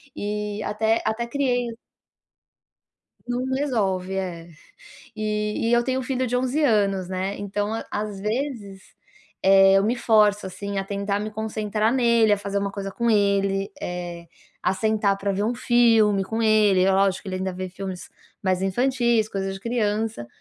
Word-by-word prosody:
E 210 Hz, 0 st, -3 dB
até 220 Hz, +2 st, 0 dB
até 220 Hz, +2 st, -1 dB
criei 245 Hz, -3 st, -1 dB, 1.5 s
Não 245 Hz, +1 st, -2 dB
resolve, 195 Hz, -9 st, -1 dB
é. 175 Hz, -3 st, -4 dB, 0.7 s
E 210 Hz, +1 st, -1 dB
e -, -, +1 dB
eu 240 Hz, 0 st, +4 dB
tenho 260 Hz, 0 st, 0 dB
um -, -, -4 dB
filho 255 Hz, 0 st, -1 dB
de 245 Hz, -, 0 dB
11 260 Hz, +5 st, 0 dB
anos, 200 Hz, -7 st, +2 dB
né, 190 Hz, +1 st, -3 dB
então 205 Hz, +1 st, -2 dB
a 225 Hz, -, -4 dB
às 205 Hz, -2 st, -4 dB
vezes, 210 Hz, -4 st, -3 dB, 0.6 s
eh, 195 Hz, 0 st, +6 dB
eu 195 Hz, +1 st, +4 dB
me 230 Hz, -, +1 dB
forço, 210 Hz, -4 st, +3 dB
assim, 200 Hz, +1 st, -5 dB
a 195 Hz, -, -2 dB
tentar 200 Hz, 0 st, -2 dB
me 215 Hz, -, -4 dB
concentrar 215 Hz, 0 st, -1 dB
nele, 235 Hz, -4 st, +3 dB
a 205 Hz, -, +3 dB
fazer 200 Hz, 0 st, -2 dB
uma 200 Hz, 0 st, -2 dB
coisa 195 Hz, -1 st, -5 dB
com 235 Hz, +3 st, -1 dB
ele, 200 Hz, -1 st, +1 dB
eh, 175 Hz, -1 st, -5 dB, 0.4 s
a 190 Hz, -, +1 dB
sentar 210 Hz, -1 st, +1 dB
para 200 Hz, 0 st, -2 dB
ver 200 Hz, +2 st, -1 dB
um 235 Hz, +3 st, 0 dB
filme 225 Hz, -5 st, +3 dB
com 225 Hz, +3 st, -2 dB
ele, 210 Hz, -4 st, +4 dB
é 195 Hz, -, +3 dB
lógico, 190 Hz, -1 st, +2 dB
que 200 Hz, -, -8 dB
ele 185 Hz, -, -3 dB
ainda 190 Hz, 0 st, -3 dB
vê 185 Hz, 0 st, -5 dB
filmes 185 Hz, 0 st, -7 dB, 0.3 s
mais 185 Hz, -2 st, +1 dB
infantis, 235 Hz, +1 st, +1 dB
coisas 195 Hz, -2 st, -3 dB
de 195 Hz, -, -9 dB
criança, 220 Hz, -, -1 dB
210 Hz, 170 wpm, -24 LUFS, 195-225 Hz, 1.5 s, eh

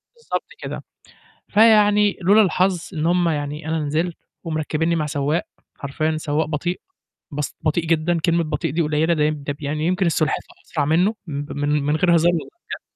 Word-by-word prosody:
بالضبط 470 Hz, -, -4 dB
كده، -, -, -6 dB, 0.7 s
فيعني 210 Hz, -1 st, +5 dB
لولا 205 Hz, +5 st, +6 dB
الحظ 185 Hz, -1 st, +1 dB
إن 155 Hz, 0 st, -1 dB
هم 175 Hz, 0 st, +2 dB
يعني 150 Hz, 0 st, -3 dB
أنا 160 Hz, 0 st, 0 dB
نزلت 160 Hz, +4 st, -1 dB, 0.3 s
ومركّبيني 160 Hz, +1 st, -1 dB
مع 155 Hz, -2 st, -1 dB
سواق، 145 Hz, +2 st, 0 dB, 0.4 s
حرفيًا 155 Hz, +3 st, -2 dB
سواق 155 Hz, +1 st, -1 dB
بطيء، 165 Hz, +4 st, -3 dB, 0.5 s
بس 150 Hz, 0 st, -3 dB
بطيء 160 Hz, +1 st, 0 dB
جدًا، 165 Hz, +1 st, +1 dB
كلمة 170 Hz, -1 st, +2 dB
بطيء 150 Hz, -3 st, -2 dB
دي 170 Hz, +2 st, +1 dB
قليلة، 155 Hz, +2 st, +1 dB
ده 150 Hz, -2 st, +1 dB
يم 150 Hz, -1 st, -1 dB
ده 145 Hz, -, 0 dB
ب 145 Hz, -, -15 dB
يعني 150 Hz, +2 st, -2 dB
يمكن 185 Hz, +1 st, +1 dB
السُلحفا 155 Hz, -1 st, 0 dB, 0.2 s
أسرع 150 Hz, -3 st, -1 dB
منّه 175 Hz, +8 st, +2 dB
مب 145 Hz, -1 st, -5 dB
من 145 Hz, 0 st, -2 dB
من 150 Hz, +2 st, +1 dB
غير 170 Hz, +1 st, +3 dB
هزار 170 Hz, +1 st, +4 dB
والله 165 Hz, -, -3 dB, 0.2 s
بجد. -, -, -5 dB
160 Hz, 180 wpm, -21 LUFS, 150-175 Hz, 0.7 s, لولا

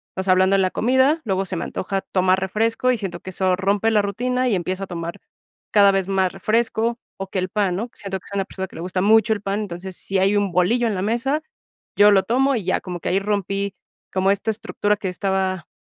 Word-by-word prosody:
o 190 Hz, -, -2 dB
sea, 190 Hz, -, +2 dB
hablando 185 Hz, +1 st, +4 dB
de 195 Hz, -, +3 dB
la 185 Hz, -1 st, +1 dB
comida, 260 Hz, +6 st, +3 dB
luego 195 Hz, -2 st, 0 dB
se 185 Hz, -1 st, -4 dB
me -, -, -3 dB
antoja 195 Hz, +1 st, -3 dB
tomar 185 Hz, 0 st, +1 dB
refresco 225 Hz, +6 st, 0 dB
y -, -, -1 dB
siento 190 Hz, -5 st, -5 dB
que 185 Hz, -, -8 dB
eso 185 Hz, 0 st, +1 dB
rompe 200 Hz, +3 st, +1 dB
la 215 Hz, -2 st, +4 dB
rutina 250 Hz, +6 st, -1 dB
y 230 Hz, -, +2 dB
empieza 185 Hz, +2 st, -3 dB
a -, -, -24 dB
tomar 170 Hz, -1 st, -5 dB, 0.5 s
cada 200 Hz, -1 st, +6 dB
vez 195 Hz, -1 st, 0 dB
más 190 Hz, -2 st, +1 dB
refresco 230 Hz, +1 st, 0 dB, 0.2 s
o 195 Hz, -, -5 dB
que 190 Hz, -, -3 dB
el 185 Hz, 0 st, -2 dB
pan, 195 Hz, -3 st, 0 dB
¿no?, 225 Hz, +6 st, -3 dB
siento 195 Hz, -1 st, -5 dB
que -, -, -19 dB
soy 200 Hz, -, -5 dB
una 195 Hz, -, 0 dB
persona 190 Hz, -1 st, -6 dB
que -, -, -17 dB
le -, -, -6 dB
gusta 185 Hz, +1 st, -2 dB
mucho 220 Hz, +2 st, +4 dB
el 205 Hz, -, -5 dB
pan, 200 Hz, 0 st, -2 dB
entonces, 185 Hz, -2 st, -6 dB
si 195 Hz, 0 st, -1 dB
hay 195 Hz, +2 st, +3 dB
un 200 Hz, -2 st, 0 dB
bolillo 225 Hz, +7 st, +2 dB
en 215 Hz, -, -1 dB
la 185 Hz, -, -2 dB
mesa, 240 Hz, +9 st, 0 dB, 0.6 s
yo 205 Hz, 0 st, +7 dB
lo 195 Hz, -1 st, +4 dB
tomo 270 Hz, +3 st, +2 dB
y 220 Hz, -, -2 dB
ya 185 Hz, -, +1 dB
como 180 Hz, -2 st, -6 dB
que -, -, -2 dB
ahí 190 Hz, -, +2 dB
rompí, 200 Hz, -1 st, -2 dB, 0.4 s
como 190 Hz, +1 st, +2 dB
esta 200 Hz, +3 st, 0 dB
estructura 210 Hz, -1 st, -1 dB
que 195 Hz, -, -3 dB
estaba 190 Hz, -1 st, -1 dB
195 Hz, 245 wpm, -22 LUFS, 185-220 Hz, 0.6 s, yo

